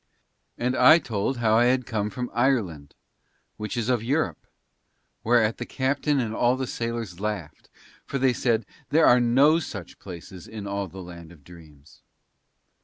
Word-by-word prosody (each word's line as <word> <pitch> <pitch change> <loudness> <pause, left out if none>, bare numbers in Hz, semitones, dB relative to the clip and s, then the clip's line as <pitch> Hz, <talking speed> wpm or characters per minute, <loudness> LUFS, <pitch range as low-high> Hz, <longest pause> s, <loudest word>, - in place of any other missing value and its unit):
And 125 +1 -1
I 130 +6 +7
told 120 -3 -2
how 110 -1 +3
I 125 +2 +4
came 110 -5 -3
from 125 +3 -5
Ireland, 110 - 0 0.6
which 105 +3 -5
is 115 -2 -1
of 125 -3 +1
Europe, 140 +7 -1 0.8
whereat 115 -1 +2
the 120 - -4
captain 140 +2 0
and 115 -3 -2
all 120 +3 +2
the 130 - -2
sailors 115 -7 -4
laughed, 105 -7 -5 0.4
for 140 - -2
they 130 -1 +2
said, 115 -3 0 0.2
"There 160 +2 +4
are 125 - +6
no 135 +7 +4
such 100 - -8
places 90 -1 -10
in 110 -2 -8
all 100 0 -3
the 95 0 -10
land 85 -2 -11
of 80 -5 -17
dreams." 75 -4 -17
115 Hz, 160 wpm, -25 LUFS, 95-125 Hz, 0.8 s, I